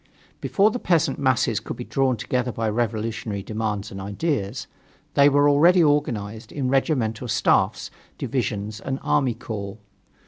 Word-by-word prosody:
Before 205 +2 +2
the 245 - -3
peasant 165 - +1
masses 130 -4 +2
could - - -7
be - - -5
drawn 135 -3 0
together 125 +3 -1
by 115 -1 -2
revolutionary 110 -2 -2
demands 105 -1 -3
and 95 - -7
ideas, 100 - -2 0.5
they 140 0 +6
were 145 +1 +4
already 170 +5 +5
organized 115 -8 -1
in 135 -3 -2
regimental 130 -4 0
staffs, 110 - +1 0.3
divisions 105 +1 -3
and 135 0 -3
army 130 -5 +1
corps. 105 -3 -6
120 Hz, 140 wpm, -23 LUFS, 110-145 Hz, 0.5 s, they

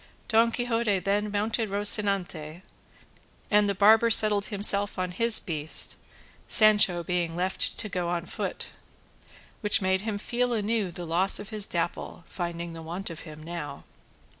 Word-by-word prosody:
Don 230 +1 +3
Quixote 230 -4 0
then 205 +2 -1
mounted 215 +2 -1
Rocinante, 195 -5 0 0.9
and 210 -1 +3
the 200 - -1
barber 220 +4 +5
settled 210 -2 +4
himself 205 -1 +2
on 185 -1 -3
his 230 +5 +4
beast, 160 -4 -2 0.5
Sancho 205 -5 +5
being 175 -2 -2
left 185 +2 -1
to 215 - -2
go 180 -3 -3
on 175 -1 -3
foot, - - -5 0.9
which 210 -2 +1
made 190 -1 0
him 215 -1 -4
feel 245 +3 -2
anew 215 -2 -1
the 175 0 -8
loss 175 +4 +1
of 200 - -7
his 215 -2 0
Dapple, 170 0 -4
finding 170 -1 -6
the 165 - -9
want 170 +3 -6
of 165 - -9
him 155 0 -11
now. 155 -4 -7
195 Hz, 150 wpm, -26 LUFS, 175-215 Hz, 0.9 s, barber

